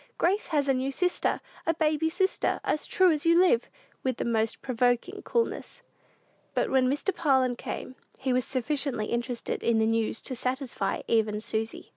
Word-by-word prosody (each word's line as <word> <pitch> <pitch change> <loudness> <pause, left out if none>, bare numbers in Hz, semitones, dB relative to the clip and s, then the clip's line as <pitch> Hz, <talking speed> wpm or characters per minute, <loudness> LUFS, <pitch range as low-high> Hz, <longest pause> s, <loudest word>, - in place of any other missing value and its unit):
Grace 390 +5 +1
has 290 -4 +1
a 270 - +4
new 260 +1 -1
sister, 360 +6 0 0.3
a 330 - +2
baby 315 0 +1
sister, 380 +3 0
as 300 - -1
true 370 -2 +4
as 300 -2 0
you 335 0 +5
live!" 370 +6 +3 0.3
with 255 -2 -1
the - - -2
most 225 -1 0
provoking 250 - 0
coolness. 475 +1 -2 0.7
But - - +1
when 260 -1 +4
Mr. 295 +7 -1
Parlin 265 -5 +2
came, 255 - -6 0.2
he 260 -1 -1
was 255 0 +2
sufficiently 265 -3 -1
interested 240 +1 -3
in 235 -1 +2
the 220 - +3
news 225 0 +1
to 260 - -5
satisfy 250 -5 -2
even 215 -2 +2
Susy. 220 0 -3
265 Hz, 170 wpm, -28 LUFS, 235-320 Hz, 0.7 s, you